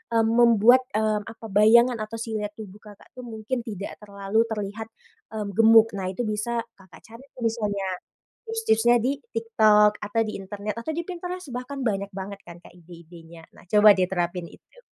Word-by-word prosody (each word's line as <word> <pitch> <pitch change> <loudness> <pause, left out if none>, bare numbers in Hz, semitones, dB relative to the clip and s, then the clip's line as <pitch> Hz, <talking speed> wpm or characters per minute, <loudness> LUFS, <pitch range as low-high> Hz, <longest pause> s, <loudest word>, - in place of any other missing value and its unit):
mmm, 225 -1 +3
membuat, 235 +2 +6
eee, 215 -1 +1 0.3
bayangan 230 +4 +5
atau 220 +1 -7
siluet 215 -2 -4
tubuh 210 -2 -11
Kakak 210 -1 -15
tuh, 250 - -8
mungkin 230 +2 -4
tidak 205 -3 -6
terlalu 200 +2 -1
terlihat, 210 +1 -4 0.5
mmm, 210 -2 -4
gemuk. 225 0 +7
Nah 185 -1 -3
itu 245 - -4
bisa 225 +2 -2 0.2
Kakak 185 -4 -17
cari 230 +4 -13
tuh 250 - -13
misalnya, 210 -4 -1 0.6
tips-tipsnya 240 - +2
di 255 +3 +1 0.2
TikTok, 215 -2 +3
atau 210 +2 -1
di 215 - -5
internet, 205 +2 -6
atau 315 - -4
di 340 - -2
Pinterest. 360 -3 -6
Bahkan 255 +3 -6
banyak 200 -2 -2
banget 195 +1 -7
kan 170 -1 -11
Kak, - - -16
ide-idenya. 170 -1 -14
Nah - - -16
coba 210 +1 +6
deh 185 - +3
terapin 175 -1 -2
itu. - - -20
215 Hz, 170 wpm, -24 LUFS, 200-230 Hz, 0.6 s, gemuk